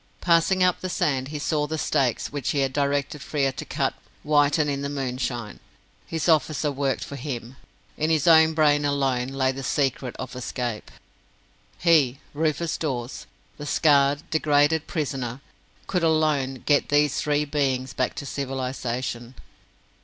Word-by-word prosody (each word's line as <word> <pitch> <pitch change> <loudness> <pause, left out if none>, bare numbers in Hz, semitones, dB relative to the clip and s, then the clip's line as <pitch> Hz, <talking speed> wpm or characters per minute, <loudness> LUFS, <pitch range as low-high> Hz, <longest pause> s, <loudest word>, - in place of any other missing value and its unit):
Passing 175 +2 +3
up 180 -1 +2
the 185 - -3
sand, 135 -6 0
he 150 +1 -5
saw 150 0 0
the 160 +1 -3
stakes 135 -5 0
which 145 -4 -2
he 140 - +1
had 135 -1 0
directed 140 0 -1
Frere 140 -2 0
to - - -7
cut - - -1 0.3
whiten 150 +1 +3
in 140 -1 -2
the 140 - -3
moonshine. 125 -4 -3 0.5
His 160 0 -2
officer 155 -2 +2
worked 135 -1 -1
for 140 - -7
him! 125 -2 -6 0.4
In 155 +1 0
his 160 -3 +2
own 160 -1 +6
brain 150 -2 +3
alone 135 -3 0
lay 135 -1 0
the 135 +1 -6
secret 135 -2 -1
of 130 - -7
escape! 120 -3 -4 0.9
He 150 -7 +3
Rufus 160 +2 -1
Dawes 130 -5 -4 0.3
the 145 - -6
scarred, 145 -2 +3
degraded 150 0 +2
"prisoner", 130 -5 -3 0.5
could 180 -2 -1
alone 155 -5 +1
get 145 -1 +2
these 145 -1 +2
three 150 0 +1
beings 135 -3 -1
back 130 - -1
to 145 - -6
civilization. 130 -3 -4
145 Hz, 150 wpm, -25 LUFS, 130-155 Hz, 0.9 s, own